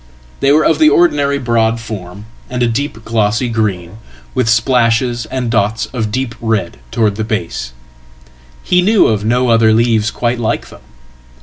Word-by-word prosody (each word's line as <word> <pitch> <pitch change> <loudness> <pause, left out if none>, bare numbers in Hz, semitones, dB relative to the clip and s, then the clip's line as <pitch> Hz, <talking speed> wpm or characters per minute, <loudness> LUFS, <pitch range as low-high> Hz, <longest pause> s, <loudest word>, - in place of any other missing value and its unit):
They 135 - +2
were 150 +1 +4
of 160 -2 +2
the 155 -1 +6
ordinary 145 -3 +2
broadform, 110 -6 -2 0.3
and 125 -1 -1
a - - +2
deep 115 -2 -3
glossy 115 +2 0
green, 105 -4 -2 0.4
with 110 - 0
splashes 120 0 +1
and 125 -3 -3
dots 110 0 0
of 110 -4 -2
deep 130 0 -2
red 110 -6 -2
towardsthe 110 -2 0
base 65 - -4 0.9
He 180 0 +2
knew 210 +3 +4
of 105 -2 0
no 120 +3 +1
other 115 -1 +4
leaves 110 -1 +2
quite 120 +2 -2
like 110 - -2
them. - - -15
115 Hz, 150 wpm, -15 LUFS, 110-125 Hz, 0.9 s, the